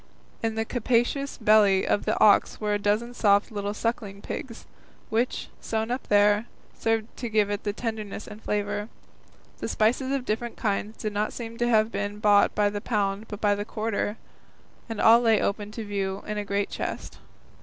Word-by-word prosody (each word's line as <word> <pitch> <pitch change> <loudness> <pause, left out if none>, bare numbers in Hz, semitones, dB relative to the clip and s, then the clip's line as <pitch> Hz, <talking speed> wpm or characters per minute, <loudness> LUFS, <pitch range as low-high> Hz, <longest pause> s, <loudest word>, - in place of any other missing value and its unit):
In 225 -1 -1
the 225 0 -1
capacious 245 +4 0
belly 210 -3 +4
of - - +1
the - - 0
ox 210 - +5
were 210 -1 0
a 205 - +1
dozen 210 +4 0
soft 205 -3 +3
little 205 -1 -3
sucking 210 -3 -3
pigs, 230 -3 -6 0.5
which, 235 +3 0
sewn 220 +1 -2
up 250 - -3
there, 205 +2 +4 0.3
served 225 -1 0
to 240 - -4
give 210 -2 +2
it 205 - -2 0.2
tenderness 220 -3 -4
and 210 - -11
flavour. 205 0 -2 0.7
The - - -3
spices 250 +5 +1
of 275 -2 -1
different 230 +2 -3
kinds 210 0 -2
did 215 -2 -4
not 210 +1 -1
seem 230 -1 -7
to 240 0 +2
have 220 -1 +3
been 205 +1 -3
bought 205 -1 +4
by 205 -1 +2
the 205 0 -4
pound 205 -1 -1
but 210 -1 -7
by 205 -1 +3
the 205 0 -2
quarter, 215 -1 -2 0.7
and 225 - -4
all 230 +2 +7
lay 225 -3 +4
open 205 +1 -1
to 225 -1 -5
view 195 -1 -3
in 210 0 -3
a 205 - -4
great 200 0 -1
chest. - - -5
215 Hz, 185 wpm, -26 LUFS, 205-225 Hz, 0.7 s, all